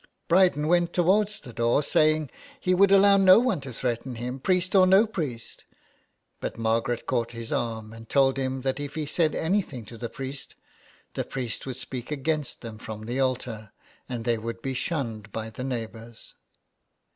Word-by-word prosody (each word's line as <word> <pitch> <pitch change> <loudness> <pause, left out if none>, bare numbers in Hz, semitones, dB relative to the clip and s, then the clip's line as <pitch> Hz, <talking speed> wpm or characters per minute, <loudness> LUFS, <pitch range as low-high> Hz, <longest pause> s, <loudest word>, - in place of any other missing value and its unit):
Bryden 175 -4 +4
went 175 0 +2
towards 200 +4 +2
the 125 -4 -11
door, 120 +5 +2
saying 155 -1 +2 0.3
he 185 -7 +1
would 195 +1 +5
allow 200 0 +7
no 190 -1 +8
one 230 - +2
to 135 -1 -7
threaten 120 +1 -3
him, 125 +3 -5
priest 185 +5 +1
or 185 -2 +6
no 190 +4 +6
priest, 150 - -5 0.8
but - - -4
Margaret 115 +1 0
caught 115 0 -1
his 115 +3 -5
arm 115 -5 -3
and 115 0 -12
told 135 -1 +3
him 130 0 -2
that 135 +1 -1
if 145 +1 -5
he 155 -1 -2
said 155 +2 +1
anything 160 - -1
to 115 +1 -11
the 120 - -4
priest, 135 +2 -7 0.6
the - - -2
priest 125 -1 -5
would 130 -2 -4
speak 125 -2 -6
against 150 +1 -2
them 110 -2 -8
from 110 -2 -7
the 120 +3 -3
altar, 120 -5 -2 0.4
and 120 -2 -4
they 120 -2 +1
would 115 +1 -6
be 135 - -2
shunned 115 - -3
by 110 +1 -5
the 125 - -6
neighbours. 115 -2 -6
130 Hz, 180 wpm, -26 LUFS, 115-165 Hz, 0.8 s, no